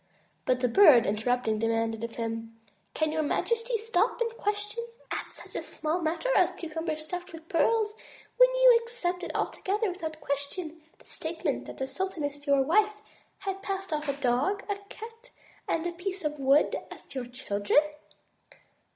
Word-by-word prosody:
But 255 Hz, -1 st, +2 dB
the 250 Hz, -, +3 dB
Bird, 255 Hz, -, +7 dB
interrupting, 220 Hz, +1 st, +1 dB
demanded 225 Hz, 0 st, 0 dB
of 230 Hz, 0 st, -5 dB
him: 225 Hz, 0 st, -4 dB, 0.4 s
"Can 310 Hz, -1 st, +1 dB
your 315 Hz, 0 st, 0 dB
majesty 465 Hz, +9 st, 0 dB
stop 440 Hz, +1 st, +1 dB
and 465 Hz, -1 st, -1 dB
question 415 Hz, +2 st, -2 dB, 0.3 s
at -, -, -3 dB
such -, -, -11 dB
a -, -, -1 dB
small 320 Hz, +3 st, -2 dB
matter 335 Hz, +10 st, 0 dB
as -, -, +4 dB
cucumbers 320 Hz, -1 st, -4 dB
stuffed 355 Hz, +3 st, -6 dB
with 325 Hz, 0 st, -10 dB
pearls, 430 Hz, +5 st, +2 dB, 0.4 s
when -, -, +8 dB
you -, -, +7 dB
accepted 370 Hz, -7 st, -3 dB
altogether 410 Hz, +1 st, 0 dB
without 320 Hz, -4 st, -5 dB
question 310 Hz, +4 st, -4 dB, 0.2 s
the -, -, -22 dB
state 330 Hz, +1 st, -5 dB
ment -, -, 0 dB
that -, -, -9 dB
the 265 Hz, -, -1 dB
sultaness 290 Hz, -1 st, -4 dB
your 280 Hz, -1 st, +5 dB
wife, 420 Hz, +8 st, +3 dB, 0.4 s
had 390 Hz, 0 st, -4 dB
passed 390 Hz, -3 st, -3 dB
off 300 Hz, -1 st, -2 dB
a -, -, +2 dB
dog, 275 Hz, +11 st, +1 dB
a 405 Hz, -1 st, -2 dB
cat, 460 Hz, +2 st, -10 dB, 0.4 s
and 325 Hz, -, 0 dB
a 350 Hz, -, 0 dB
piece 375 Hz, +2 st, -5 dB
of 300 Hz, -1 st, -2 dB
wood 275 Hz, +2 st, +4 dB
as -, -, -12 dB
your 255 Hz, -3 st, -4 dB
children?" 245 Hz, +1 st, +2 dB
325 Hz, 165 wpm, -29 LUFS, 270-405 Hz, 0.4 s, when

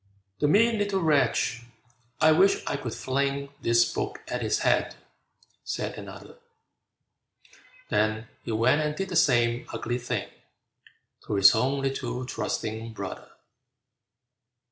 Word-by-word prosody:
"The 150 Hz, -, +2 dB
mean 220 Hz, +7 st, +4 dB
little 205 Hz, -1 st, 0 dB
wretch, 145 Hz, -6 st, +2 dB, 0.6 s
I 155 Hz, 0 st, +6 dB
wish 195 Hz, +5 st, +3 dB
I -, -, -1 dB
could 125 Hz, -5 st, -5 dB
fling 140 Hz, +1 st, -1 dB
This 120 Hz, 0 st, +4 dB
book 410 Hz, +2 st, -3 dB
at -, -, -3 dB
his -, -, +1 dB
head!" -, -, +2 dB, 0.7 s
said -, -, -4 dB
another; 475 Hz, -, -11 dB, 1.5 s
Then 110 Hz, +1 st, 0 dB, 0.2 s
he -, -, -5 dB
went 120 Hz, +7 st, +3 dB
and 150 Hz, 0 st, -1 dB
did 195 Hz, +2 st, -3 dB
the 180 Hz, -, -4 dB
same 120 Hz, -6 st, +3 dB
ugly 120 Hz, +2 st, -3 dB
thing 120 Hz, -, -3 dB, 1.0 s
To -, -, -1 dB
his 100 Hz, 0 st, +7 dB
own 135 Hz, +5 st, 0 dB
little 130 Hz, -2 st, -3 dB
trusting 110 Hz, -2 st, -4 dB
brother! 100 Hz, -3 st, -7 dB
130 Hz, 125 wpm, -27 LUFS, 115-155 Hz, 1.5 s, his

